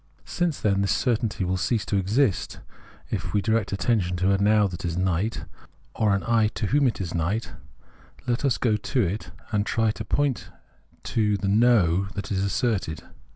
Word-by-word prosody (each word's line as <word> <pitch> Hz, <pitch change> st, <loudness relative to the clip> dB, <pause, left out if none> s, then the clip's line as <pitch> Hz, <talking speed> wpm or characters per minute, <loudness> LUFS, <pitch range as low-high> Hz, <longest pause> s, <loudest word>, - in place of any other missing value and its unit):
Since, 175 Hz, -4 st, -1 dB
then, 100 Hz, -2 st, +1 dB
this 100 Hz, -, +1 dB
certainty 115 Hz, -5 st, 0 dB
will 90 Hz, +1 st, 0 dB
cease 110 Hz, +4 st, 0 dB
to -, -, -2 dB
exist 100 Hz, +2 st, 0 dB, 0.5 s
if -, -, -1 dB
m^ 100 Hz, -1 st, -1 dB
direct 110 Hz, -2 st, 0 dB
its 100 Hz, -, -3 dB
attention 95 Hz, -7 st, +1 dB
to 95 Hz, +2 st, +2 dB
a 100 Hz, -, +2 dB
Now 105 Hz, +1 st, +4 dB
that 90 Hz, -3 st, -5 dB
is 85 Hz, -1 st, -2 dB
night 95 Hz, +4 st, -1 dB, 0.5 s
or 105 Hz, -3 st, +2 dB
an 100 Hz, -, -2 dB
I 115 Hz, -2 st, +3 dB
to -, -, -2 dB
whoi 140 Hz, +5 st, +3 dB
it 120 Hz, -, -2 dB
is 90 Hz, -4 st, -4 dB
night, 95 Hz, +7 st, -1 dB, 0.7 s
let 120 Hz, +1 st, -1 dB
us 135 Hz, -4 st, +2 dB
go 110 Hz, -4 st, +1 dB
to 125 Hz, +4 st, -1 dB
it 95 Hz, +4 st, -3 dB, 0.2 s
and 105 Hz, -2 st, +1 dB
try 110 Hz, +1 st, +1 dB
to 110 Hz, -, -6 dB
point 140 Hz, +4 st, -1 dB, 0.5 s
to 105 Hz, -2 st, +1 dB
the 100 Hz, -, -3 dB
No 100 Hz, -4 st, +3 dB
that 100 Hz, 0 st, -5 dB
is 95 Hz, -1 st, 0 dB
asserted. 100 Hz, -5 st, -1 dB
105 Hz, 190 wpm, -25 LUFS, 95-115 Hz, 0.7 s, Now